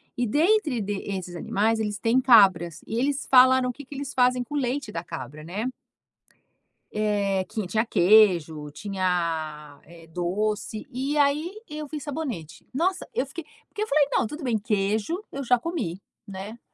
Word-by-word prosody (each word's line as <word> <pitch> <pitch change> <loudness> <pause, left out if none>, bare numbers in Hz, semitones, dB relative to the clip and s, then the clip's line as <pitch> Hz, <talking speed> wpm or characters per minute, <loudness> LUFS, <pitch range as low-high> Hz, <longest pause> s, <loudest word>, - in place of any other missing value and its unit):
E, 245 -1 0
dentre 305 - +2
de 200 0 -3
esses 180 -2 -5
animais, 220 +6 0
eles 210 -2 -2
têm 235 +4 +2
cabras. 190 -9 +5
E 225 +2 -2
eles 280 +2 0
falaram 260 0 +6
o - - -3
que 285 - -10
que 280 - -10
eles 275 0 -5
fazem 250 -1 +3
com 245 - -11
o - - +1
leite 260 -2 -2
da 165 -3 -4
cabra, 155 -3 -8
né? 210 +10 -3 1.2
Eh, 200 -3 0
que 215 -3 -4
tinha 220 +4 +1
queijo, 175 -8 +4
tinha, 165 -5 -2
eh, 165 0 -15
doce. 210 +6 -2
E 270 +4 -2
aí 295 +6 +2 0.2
eu 300 0 -6
vi 300 0 -6
sabonete. 255 - -6
Nossa, 365 +6 0
eu 260 - 0
fiquei 310 +3 -8 0.2
porque 420 - -6
eu 435 - -4
falei: 290 0 +3
“Não, - - +2
tudo 300 +6 -8
bem, 230 -4 0
queijo 215 - -1
eu 275 - -5
já 250 0 +4
comi, 235 - -4 0.3
né? 200 +4 -8
220 Hz, 170 wpm, -25 LUFS, 185-275 Hz, 1.2 s, falaram